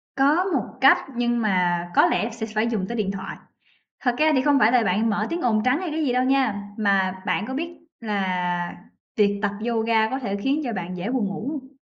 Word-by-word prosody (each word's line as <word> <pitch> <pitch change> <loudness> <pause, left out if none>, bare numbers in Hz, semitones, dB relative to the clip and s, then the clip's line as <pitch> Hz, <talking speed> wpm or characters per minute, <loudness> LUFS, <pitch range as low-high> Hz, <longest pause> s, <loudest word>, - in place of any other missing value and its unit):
Có 290 +6 +3
một 310 - -1 0.2
cách 270 +1 +7 0.2
nhưng 240 0 0
mà 180 -4 +1
có - - +6
lẽ 220 - +1
sẽ 225 -1 -5
phải 215 +2 +2
dùng 220 -5 -1
tới 235 - -4
điện 200 -3 -1
thoại. 195 -1 -6 0.6
Thật 245 -3 +1
ra 310 0 +4
thì 260 - +2
không 290 -1 +3
phải 225 -1 +4
là 250 -2 +4
bạn 215 +3 +1
mở 210 +1 0
tiếng 340 - -2
ồn 220 -5 +1
trắng 255 +5 +2
hay 365 -3 -3
cái 315 +1 -1
gì 255 - +1
đâu 250 +1 +2
nha, 255 -7 +1
mà 190 -3 +1
bạn 200 - 0
có 260 - -5
biết 330 +5 -3 0.3
là 180 -5 -2 0.4
tiệc 205 -2 +4
tập 205 - +1 0.2
yoga 225 -1 +1
có 265 - -2
thể 205 -7 -3
khiến 270 +9 0
cho 240 - -2
bạn 180 -3 -5
dễ 180 +6 -4
buồn 250 -5 0
ngủ 200 +6 -5
hông? 275 -4 -6
225 Hz, 235 wpm, -23 LUFS, 200-265 Hz, 0.6 s, cách